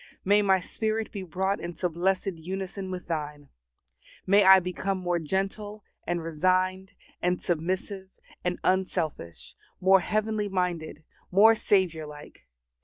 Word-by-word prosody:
May 205 +2 +5
my 190 -2 +3
spirit 220 +3 -3
be 200 - -5
brought 190 +3 -1
into 175 +1 -3
blessed 185 +3 0
unison 190 +3 -6
with 185 -1 -6
Thine. 150 -3 -5 0.8
May 200 +2 +5
I 190 0 +9
become 185 +2 -3
more 175 -1 -1
gentle, 195 +5 -3 0.2
and 175 -1 -1
resigned, 185 +4 0 0.3
and 180 0 +1
submissive, 185 +3 -3 0.3
and 180 0 -1
unselfish; 175 - -2 0.3
more 190 +1 +5
heavenly 215 +2 -1
minded; 175 -5 -2 0.3
more 210 +4 +6
Saviour 185 -7 +1
like. 150 - -13
185 Hz, 125 wpm, -27 LUFS, 170-195 Hz, 0.8 s, I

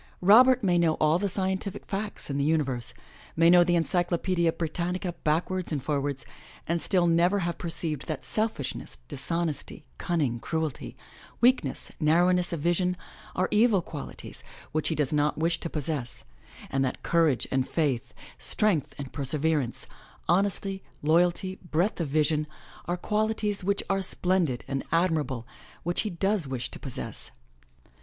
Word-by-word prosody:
Robert 245 +6 +7
may 175 -3 +3
know 165 -2 +3
all 155 +2 +3
the 200 +1 0
scientific 190 +1 -2
facts 200 -6 -4
in 140 - -1
the 140 +2 +2
imiverse, 130 -6 0 0.4
may 165 +1 +6
know 175 0 +8
the 175 0 +2
Encyclopedia 175 0 +1
Britannica 175 +2 -2
backwards 175 +4 0
and 150 - 0
forwards, 140 -2 -2 0.4
and 170 0 0
still 180 -3 +2
never 175 +4 +3
have 170 0 -2
per 170 - -3
ceived 160 -4 -2
that 155 -4 -4
selfishness, 210 - -3
dishonesty, 165 - -3
cunning, 145 -9 0
cruelty, 160 +1 -3 0.4
weakness, 240 - +2
narrowness 175 +3 +3
of 165 -4 -3
vision, 180 +2 +1 0.4
are 185 - +2
evil 215 -1 +5
qualities 150 -3 -8 0.3
which 155 0 0
he 160 - 0
does 150 -1 0
not 150 0 +2
wish 165 +1 +1
to 165 - -4
possess, 145 -5 -4 0.5
and 135 0 +1
that 130 - -3
courage 165 -7 +2
and 130 -1 +1
faith, 140 -8 -1 0.2
strength 165 - 0
and 140 -3 -7
perseverance, 145 -2 -1 0.4
honesty, 195 +1 +1 0.2
loyalty, 175 +4 +2
breadth 175 +4 +1
of 165 - -1
vision, 155 +1 +1 0.4
are 175 +1 -1
qualities 210 0 0
which 200 +2 0
are 195 0 +1
splendid 180 -8 0
and 135 0 -2
admirable, 155 -8 +1 0.4
which 175 +1 0
he 215 - -2
does 195 -2 0
wish 130 -2 -4
to - - -9
possess. 130 -5 -7
170 Hz, 150 wpm, -27 LUFS, 150-185 Hz, 0.5 s, know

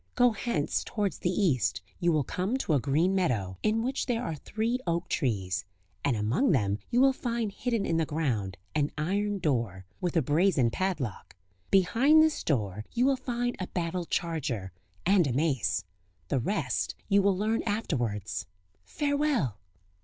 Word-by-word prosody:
Go 245 -1 +5
hence 200 -8 -1
towards 205 -4 -2
the 175 - 0
East; 140 - +1 0.2
you 175 0 +3
will 155 -3 +2
come 190 - -1
to 180 - 0
a 145 - +4
green 155 +8 +2
meadow, 110 - 0
in 220 +1 +1
which 260 +3 -1
there 240 -1 0
are 190 - -2
three 220 - -2
oak 170 +1 0
trees; 100 - -1 0.4
and 140 - +2
among 120 - +2
them 105 -6 +1
you 240 - +2
will 270 +1 +6
find 235 -4 -2
hidden 230 0 -1
in 165 - +1
the 165 - +2
ground 115 -12 -1 0.2
an 150 -1 +1
iron 200 +6 0
door, 115 - -1
with 175 -1 -1
a 160 - +3
brazen 145 -4 +3
padlock; 165 - -3 0.3
behind 245 - +5
this 315 -1 +1
door 105 - -1
you 245 +2 +2
will 275 0 +4
find 245 -1 -2
a 185 - -3
battle 175 0 -2
charger, 135 - -2 0.3
and 190 -4 +4
a 130 - -1
mace; 135 - +1 0.4
the 135 - +1
rest 200 - -1
you 200 -1 +4
will 195 -1 +2
learn 220 +3 +1
afterwards;... 120 - -2 0.4
farewell!" 285 - 0
175 Hz, 165 wpm, -29 LUFS, -, 0.4 s, will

